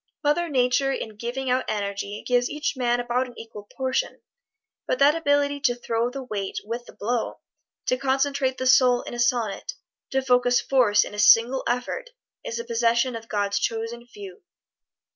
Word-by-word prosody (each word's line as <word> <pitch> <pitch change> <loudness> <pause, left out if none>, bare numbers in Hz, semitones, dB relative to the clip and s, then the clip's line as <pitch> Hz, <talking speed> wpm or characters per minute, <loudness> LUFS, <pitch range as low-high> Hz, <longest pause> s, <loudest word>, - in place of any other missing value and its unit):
Mother 330 +4 +1
Nature 260 0 +2
in 220 -5 -4
giving 250 +4 -3
out 255 +1 +1
energy 200 0 -3
gives 245 -1 +2
each 300 0 -2
man 245 -1 +1
about 245 +1 0
an 245 - -14
equal 210 -2 -10
portion. 260 -1 -1 0.7
But - - 0
that 280 +2 +5
ability 285 -3 +1
to 255 -4 +1
throw 235 0 -1
the 270 +1 -6
weight 200 -5 -4
with 235 +2 -5
the - - -12
blow, 235 +3 -3 0.4
to 255 - +1
concentrate 270 0 0
the 260 - -3
soul 255 -1 +5
in - - -8
a 240 - -6
sonnet, 240 - 0 0.4
to 265 0 0
focus 250 -1 +3
force 240 -6 +3
in - - -8
a 210 - -6
single 230 +5 +5
effort, 250 - -2 0.3
is 230 - -4
the 235 - -3
possession 235 +1 +1
of 230 0 -9
God's 205 -1 0
Chosen 230 +2 -3
Few. 400 - -11
245 Hz, 175 wpm, -24 LUFS, 230-270 Hz, 0.7 s, that